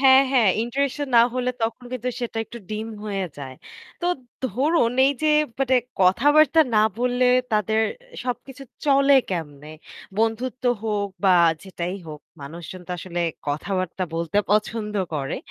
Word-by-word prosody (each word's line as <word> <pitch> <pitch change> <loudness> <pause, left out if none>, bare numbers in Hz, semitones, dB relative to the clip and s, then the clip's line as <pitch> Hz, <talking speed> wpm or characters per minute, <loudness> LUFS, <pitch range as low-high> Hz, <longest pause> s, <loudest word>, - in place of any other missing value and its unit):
হ্যাঁ, 265 0 +7
হ্যাঁ, 235 -6 +4
ইন্টারেকশন 280 +4 -2
না 230 - +9
হলে 250 0 0
তখন 230 +2 -2
কিন্তু 250 0 -3
সেটা 240 -2 -4
একটু 235 - -10
ডিম 215 +1 -4 0.2
হয়ে 195 -3 -2
যায়। 135 -2 -7 0.5
তো 350 - -1 0.4
ধরুন 255 - +1
এই 280 - +3
যে 310 - +3 0.3
মানে 260 -1 +2 0.2
কথাবার্তা 290 - +5
না 215 - +5 0.2
বললে 250 +1 +2 0.3
তাদের 220 +1 +2 0.4
সবকিছু 260 +2 -5 0.2
চলে 275 0 +5 0.2
কেমনে? 150 -4 -5 0.5
বন্ধুত্ব 230 +3 -1 0.2
হোক 210 -2 -1 0.2
বা 185 - +6 0.3
যেটাই 180 -1 -5
হোক 150 -1 -8 0.2
মানুষজন 165 +5 -8
তো - - -10
আসলে 175 0 -4 0.3
কথাবার্তা 185 +4 -2
বলতে 170 +4 0
পছন্দ 210 0 0 0.2
করে। 135 -2 -2
225 Hz, 140 wpm, -23 LUFS, 185-255 Hz, 0.5 s, না